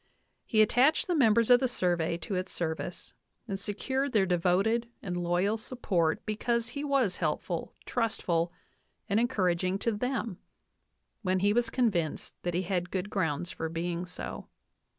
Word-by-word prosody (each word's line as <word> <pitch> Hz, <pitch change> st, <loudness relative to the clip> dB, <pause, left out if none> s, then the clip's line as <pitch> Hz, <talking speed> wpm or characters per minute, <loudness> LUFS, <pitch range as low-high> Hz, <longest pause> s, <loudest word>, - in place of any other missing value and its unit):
He 215 Hz, -2 st, +5 dB
attached 250 Hz, +8 st, +4 dB
the 360 Hz, -, 0 dB
members 235 Hz, -5 st, +4 dB
of 245 Hz, -, +8 dB
the 260 Hz, -, +2 dB
Survey 175 Hz, -7 st, 0 dB
to 195 Hz, -, -4 dB
its 185 Hz, 0 st, -2 dB
service 160 Hz, -2 st, -4 dB, 0.3 s
and 195 Hz, -3 st, -3 dB
secured 260 Hz, +7 st, -2 dB
their 205 Hz, -3 st, +4 dB
de 180 Hz, -1 st, +2 dB
voted 200 Hz, +7 st, +2 dB, 0.2 s
and 180 Hz, -3 st, -3 dB
loyal 175 Hz, +5 st, +1 dB
support 190 Hz, -9 st, -1 dB
because 230 Hz, +2 st, 0 dB
he 285 Hz, +4 st, -5 dB
was 275 Hz, -9 st, +1 dB
helpful, 165 Hz, +1 st, -2 dB
trustful, 175 Hz, -8 st, 0 dB, 0.6 s
and 210 Hz, 0 st, +2 dB
encouraging 185 Hz, -6 st, +1 dB
to 230 Hz, -, 0 dB
them 230 Hz, -3 st, -2 dB, 0.8 s
when 185 Hz, -3 st, +1 dB
he 205 Hz, +1 st, +4 dB
was 235 Hz, 0 st, +2 dB
convinced 200 Hz, -, 0 dB
that 175 Hz, -1 st, -2 dB
he 180 Hz, -, +1 dB
had 180 Hz, -1 st, -1 dB
good 190 Hz, +2 st, -3 dB
grounds 170 Hz, -3 st, -1 dB
for 160 Hz, -, -4 dB
being 170 Hz, +2 st, -3 dB
so. 180 Hz, -, -7 dB
195 Hz, 155 wpm, -30 LUFS, 175-235 Hz, 0.8 s, of